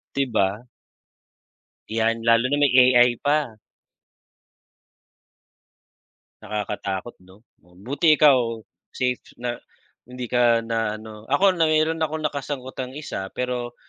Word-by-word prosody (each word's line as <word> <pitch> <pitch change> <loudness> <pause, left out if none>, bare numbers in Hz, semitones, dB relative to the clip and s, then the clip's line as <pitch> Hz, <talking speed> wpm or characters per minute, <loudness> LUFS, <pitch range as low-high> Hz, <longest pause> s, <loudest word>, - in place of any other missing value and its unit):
'Di 140 - +2
ba? 100 +2 0 1.3
Yan 115 0 0
lalo 115 +2 +4
na 145 - +1
may 145 -2 +3 0.2
AI 120 0 +4
pa. 145 -7 0 2.8
Nakakatakot 105 0 -4
'no? 95 +1 -18 0.3
Buti 125 - +1
ikaw 145 -4 +6 0.6
safe 125 -1 -1 0.2
na 120 -1 -3 0.5
hindi 125 0 -7
ka 120 -2 +3
na 115 -2 -2
ano 110 -1 -11
ako 190 +7 +4
na 165 - +3
mayro'n 155 +1 +1
akong 155 0 -4
nakasagutang 135 -3 -4
isa 130 -9 -6
pero 125 -1 -4
125 Hz, 110 wpm, -23 LUFS, 110-145 Hz, 2.8 s, ikaw